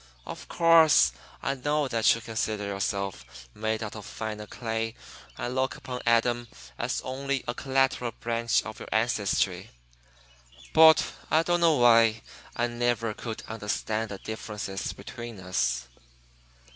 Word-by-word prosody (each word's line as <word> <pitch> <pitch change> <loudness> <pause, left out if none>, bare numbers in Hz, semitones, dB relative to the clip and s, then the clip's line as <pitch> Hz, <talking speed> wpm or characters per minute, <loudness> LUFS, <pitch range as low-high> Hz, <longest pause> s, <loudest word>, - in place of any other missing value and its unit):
Of - - -8
course, 165 -2 +6 0.3
I - - 0
know 145 +2 0
that 115 -3 +3
you 115 - -7
consider 110 -2 -2
yourselves 100 -5 -2 0.3
made 110 +1 -2
out 105 - -6
of 105 - -8
finer 105 0 -6
clay 115 0 -3 0.4
and 120 - -3
look 130 0 0
upon 125 -1 -6
Adam 120 +1 +2 0.3
as - - -1
only 135 +1 -3
a 120 - -1
collateral 135 -2 +1
branch 115 0 +1
of 110 - -8
your - - -9
ancestry; 110 -3 0 1.0
but 160 0 +7 0.2
I 160 +1 +4
don't 175 0 +1
know 165 -2 +5
why. 115 -2 +5 0.3
I 120 - +1
never 120 -2 -1
could 110 +1 -6
understand 110 0 -2
the 100 - -6
differences 105 -2 -5
between 120 -3 -9
us." 65 -9 -1
115 Hz, 135 wpm, -27 LUFS, 110-130 Hz, 1.0 s, but